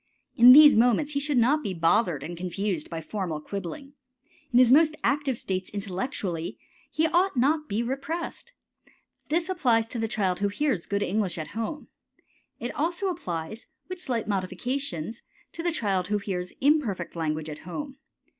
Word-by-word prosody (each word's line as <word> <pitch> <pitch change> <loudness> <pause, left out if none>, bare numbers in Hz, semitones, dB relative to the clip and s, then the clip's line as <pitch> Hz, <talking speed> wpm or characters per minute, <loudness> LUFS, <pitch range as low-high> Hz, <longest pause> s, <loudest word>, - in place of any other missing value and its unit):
In 245 +2 +9
these 295 +2 +9
moments 245 +6 +3
he 280 - +1
should 285 -1 0
not 265 +6 +3
be 195 -7 -4
bothered 165 -2 +2
and 175 +3 -6
confused 180 -1 -3
by 165 -1 -5
formal 175 -4 -4
quibbling. 200 - -7 0.6
In 240 - +3
his 250 -1 +6
most 310 +2 +5
active 275 -1 +1
states 185 -3 -3
intellectually 190 -3 -4 0.3
he 315 - +1
ought 350 -1 +2
not 275 +6 +4
to 305 0 -14
be 215 +4 -1
repressed. 320 - -5 0.8
This 330 +2 +1
applies 245 -12 +2
to 240 - -4
the 225 - 0
child 190 -4 -1
who 200 - +1
hears 210 - -1
good 200 0 0
English 200 -2 -1
at 155 -2 -5
home. 230 +7 -5 0.7
It 240 - -4
also 345 +6 -1
applies, 180 - -5 0.2
with 370 -1 -6
slight 240 -9 -2
modifications, 215 - -3 0.3
to 335 - -5
the 345 0 0
child 195 - -1
who 210 +1 +1
hears 185 -3 -4
imperfect 255 - +1
language 155 -1 -2
at 150 -1 -7
home. 270 - -7
225 Hz, 165 wpm, -26 LUFS, 185-285 Hz, 0.8 s, In